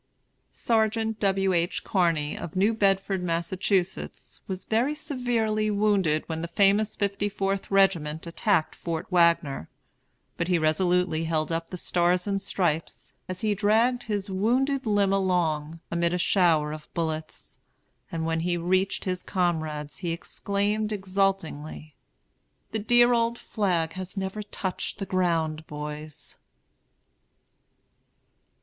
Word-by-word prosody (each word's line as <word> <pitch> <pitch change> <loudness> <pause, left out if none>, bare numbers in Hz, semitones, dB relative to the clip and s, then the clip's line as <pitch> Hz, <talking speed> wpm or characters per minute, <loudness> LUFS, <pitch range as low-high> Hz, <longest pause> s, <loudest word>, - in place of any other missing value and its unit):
SERGEANT 220 -1 0
W. 195 -1 +2
H. 170 +1 0
CARNEY, 165 -6 +1
of 165 - -7
New 200 +4 +3
Bedford, 195 -2 +1
Massachusetts, 180 +2 -2
was 185 -1 -5
very 245 +7 +1
severely 230 -7 0
wounded 200 -7 +2
when 160 -1 -3
the 170 - -3
famous 200 +4 +3
Fifty 200 0 -1
Fourth 195 0 -2
Regiment 175 -6 +2
attacked 170 0 +1
Fort 165 -1 -4
Wagner; 170 - +2 0.7
but 170 - -1
he 180 -1 +3
resolutely 165 +1 +1
held 160 -1 -1
up 165 0 -2
the 180 - -6
Stars 175 +1 +1
and 200 -1 -1
Stripes, 170 -5 -2 0.2
as 185 0 -5
he 215 -1 +2
dragged 220 +5 +2
his 205 -4 -3
wounded 250 +7 +1
limb 200 -2 +3
along, 165 -5 0
amid 170 +1 +1
a - - +1
shower 170 -5 +3
of 155 0 -9
bullets; 160 -2 -4 0.5
and 165 -1 -2
when 165 0 0
he 175 +1 0
reached 185 +3 +1
his 185 -1 -2
comrades 155 -5 -2
he 175 - -3
exclaimed 205 +5 -1
exultingly, 190 -6 -2 0.8
"The 220 - -1
dear 240 +3 +5
old 235 0 +1
flag 175 -9 -1
has 185 +1 -7
never 195 +2 -3
touched 195 -2 -4
the 195 - -4
ground, 165 -4 0
boys!" 150 0 -7
185 Hz, 130 wpm, -26 LUFS, 165-205 Hz, 0.8 s, dear